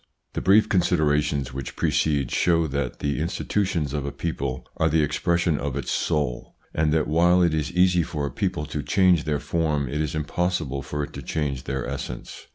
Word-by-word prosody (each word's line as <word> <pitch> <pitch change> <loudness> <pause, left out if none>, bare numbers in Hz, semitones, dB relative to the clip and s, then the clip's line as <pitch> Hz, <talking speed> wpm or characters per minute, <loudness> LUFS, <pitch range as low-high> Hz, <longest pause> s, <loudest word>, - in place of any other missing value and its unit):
T - - -2
HE - - -6
brief 105 +3 +5
considerations 75 -7 +1
which 65 -1 -6
precede 70 -5 +1
show 85 -2 +3
that 70 -3 -3
the 70 0 -1
institutions 85 -2 -1
of 75 -2 -1
a 70 - -3
people 70 -5 -3
are 80 - +2
the 80 0 +3
expres 85 +4 +1
sion 80 -3 +1
of 70 -2 -3
its 70 - -3
soul, 75 -7 -1 0.2
and 80 -1 +1
that 80 -1 +2
while 85 +3 +4
it 85 -2 +2
is 80 0 -1
easy 90 0 +4
for 75 -2 -3
a 70 - -3
people 75 - -2
to 75 0 -4
change 90 -1 +3
their 75 -2 0
form 75 -5 0
it 75 +5 -2
is 75 0 -2
impossible 75 -2 -1
for 75 +2 -3
it - - -7
to 70 - -6
change 70 -1 -3
their 65 -2 -2
essence. 65 -2 -6
75 Hz, 200 wpm, -24 LUFS, 70-85 Hz, 0.2 s, brief